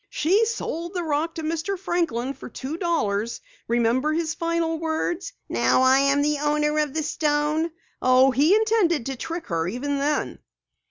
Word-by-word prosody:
"She 390 +9 +2
sold 345 -5 -4
the 355 - -1
rock 315 +1 -1
to 320 - -5
Mr. 330 +5 -2
Franklin 330 - -1
for - - -10
two 265 +5 -5
dollars. 235 - -1 0.3
Remember 240 +5 +1
his 325 0 -1
final 335 -1 -1
words: 330 +6 -2 0.2
'Now 255 - +2
I 260 +1 +5
am 275 +1 +3
the 295 0 +1
owner 300 +1 +1
of 300 -2 -1
the 315 - 0
stone.' 300 +1 0 0.3
Oh, 255 +1 +5
he 295 - +4
intended 430 - +2
to 270 - -3
trick 325 +5 -5
her 165 -1 -1
even 275 +7 -2
then!" 295 +2 -1
305 Hz, 165 wpm, -24 LUFS, 270-335 Hz, 0.3 s, I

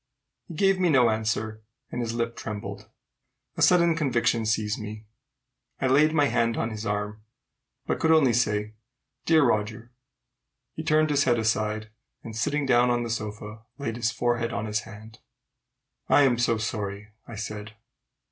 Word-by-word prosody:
He 170 - -9
gave 195 +2 +3
me 180 -2 +3
no 125 -6 +5
answer, 110 0 -2 0.3
and - - -3
his 115 -1 -3
lip 115 0 -2
trembled. 105 -2 -7 0.7
A - - -5
sudden 170 -2 +5
conviction 120 -6 +1
seized 105 -1 0
me. 110 0 -8 0.7
I - - -1
laid 145 +4 +4
my 150 -2 +3
hand 115 -4 +1
on 110 - -1
his 110 0 -5
arm, 105 +1 -3 0.6
but - - -1
could 160 - +1
only 155 -6 +5
say, 105 -2 0 0.5
"Dear 160 -2 +5
Roger!" 110 -1 -1 0.8
He - - -5
turned 155 -1 +2
his 145 -1 +2
head 120 -2 +3
aside, 110 -1 -1 0.3
and, 110 -2 -8
sitting 145 +5 0
down 125 -1 +4
on 120 0 +1
the 115 - -4
sofa, 105 0 -5 0.2
laid 115 -6 -4
his 120 -1 0
forehead 120 0 -1
on 105 +2 -3
his 105 0 -1
hand. 110 +1 -12 0.9
"I'm 135 -4 +4
so 115 -1 +2
sorry!" 105 -2 -4 0.2
I 115 - -8
said. 105 0 -6
115 Hz, 160 wpm, -26 LUFS, 110-135 Hz, 0.9 s, no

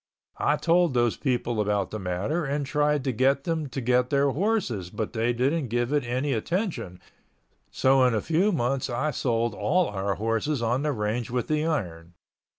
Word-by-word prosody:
I 150 - +2
told 170 -2 +2
those 120 -2 +2
people 120 -4 -1
about 100 -2 0
the 110 - -4
matter 95 - -2
and 140 0 -2
tried 150 0 +1
to 130 - 0
get 135 +4 +2
them 160 -3 -2
to 130 - -4
get 125 0 +2
their 140 0 +2
horses 150 - -1
but 110 +3 -4
they 115 +1 +1
didn't 135 +5 0
give 120 +3 -1
it 145 -2 +2
any 130 +4 -1
attention 160 - -2 0.7
so 130 0 +3
in 125 -2 +2
a - - +2
few 175 +6 +2
months 135 -4 -1
I 135 +6 -1
sold 115 -3 0
all 160 - +1
our 100 0 -2
horses 115 +7 -1
on 120 +3 0
the 150 0 0
range 110 0 -2
with 125 0 -2
the 155 +1 0
iron. 85 - -3
125 Hz, 185 wpm, -26 LUFS, 115-150 Hz, 0.7 s, so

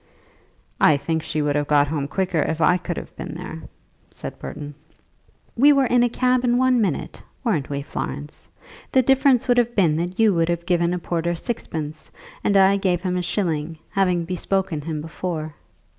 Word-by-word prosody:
"I 150 - +5
think 160 +3 -2
she 155 -1 -2
would 145 -1 0
have 145 0 0
got 145 -1 +4
home 145 -2 -2
quicker 180 0 -1
if 160 +1 -1
I 180 +3 +4
could 175 -1 -5
have - - -8
been 165 -3 -7
there," 165 -2 -7 0.5
said - - -8
Burton. 145 -1 -7 0.8
"We 280 +5 +6
were 275 -1 +3
in 245 0 +3
a 245 - +3
cab 250 +1 +1
in 245 -1 +2
one 255 -1 +3
minute; 185 -8 -2 0.2
weren't 175 - 0
we, 140 0 -3
Florence? 145 0 -6 0.4
The 260 - +4
difference 265 -1 +3
would 245 -1 +4
have 240 0 0
been 165 -6 +3
that 175 +2 -3
you 220 -3 +5
would 165 -1 +1
have 170 0 -2
given 175 -1 +1
a - - -2
porter 170 0 -2
sixpence, 160 -7 -5 0.3
and 200 - +3
I 195 +1 +5
gave 180 -3 0
him 180 -1 -1
a 180 - 0
shilling, 165 -4 -2
having 180 -3 +1
bespoken 180 -2 -1
him 155 0 -4
before." 160 -1 -5
175 Hz, 190 wpm, -22 LUFS, 155-205 Hz, 0.8 s, We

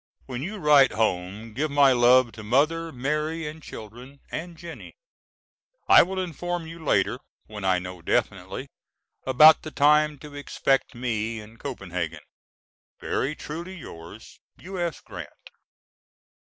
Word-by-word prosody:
When 125 -1 -5
you 200 +8 -5
write 150 -6 +5
home 105 +1 -2
give 150 +7 -1
my 140 -1 +5
love 125 0 +5
to 110 - -10
Mother, 155 +9 +1
Mary 150 +4 -2
and 155 +1 -8
children, 125 +4 -11
and 170 +1 -6
Jennie. 170 -1 -10 0.9
I - - +9
will 190 +2 -2
inform 175 0 -3
you 165 0 -10
later, 145 - +1 0.3
when 105 -2 -9
I 95 -1 +3
know 90 -1 -7
definitely, - - -2 0.6
about 150 +4 +8
the 155 - -7
time 150 0 +3
to 145 +1 -12
expect 135 -2 0
me 115 -2 -2
in 110 +2 -13
Copenhagen. 90 - -5 0.8
Very 140 +4 -2
truly 170 +6 -7
yours, 95 - -11 0.2
U.S. 175 -3 -4
GRANT. - - -11
140 Hz, 130 wpm, -25 LUFS, 110-160 Hz, 0.9 s, I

